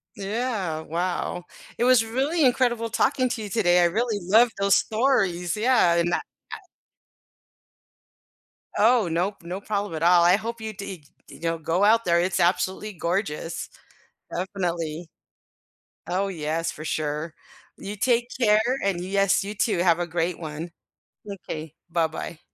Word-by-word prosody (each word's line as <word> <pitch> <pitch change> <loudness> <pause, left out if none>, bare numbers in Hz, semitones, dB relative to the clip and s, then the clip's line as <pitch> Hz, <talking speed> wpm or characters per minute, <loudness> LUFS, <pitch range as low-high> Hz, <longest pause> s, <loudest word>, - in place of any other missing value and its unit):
Yeah, 200 -6 -2
wow. 175 +1 -3 0.3
It 240 - +1
was 250 -3 +5
really 275 +7 +1
incredible 240 -2 +2
talking 255 +2 +1
to 225 - -3
you 205 - -6
today, 180 -5 +3
I - - +5
really 215 +4 0
love 220 +7 +5
those 200 0 +4
stories, 205 -8 +1
yeah, 220 -7 +4
and 170 +1 +1
that - - +1 0.3
tha - - -5 2.2
Oh, 225 -2 +4
no 175 +5 0
p 170 -3 -17
no 185 +3 -5
problem 205 -3 -3
at 155 - -5
all. 175 0 +6
I 175 +2 +6
hope 230 +2 -4
you 220 -1 -5
deeg 195 -6 -8 0.2
you - - -12
know, 165 0 -1
go 165 +5 0
out 225 +2 +4
there, 170 0 +3
it's 180 +1 0
absolutely 190 +4 0
gorgeous. 170 -2 -3 0.7
Definitely 175 -4 -3 1.0
Oh, 190 +3 0
yes, 165 -1 -2
for 155 - -9
sure. 155 +1 -3 0.4
You 205 +1 -6
take 240 +2 +1
care, 215 -2 +5 0.2
and 195 -3 0
Yes, 195 0 +2
you 205 +1 -5
too, 210 -2 0
have 175 -1 +3
a 175 - -1
great 170 +1 -2
one. 160 +1 -6 0.6
M'kay, 160 -6 -7 0.2
bye 165 -1 +1
bye. 160 +1 -7
185 Hz, 150 wpm, -25 LUFS, 170-220 Hz, 2.2 s, all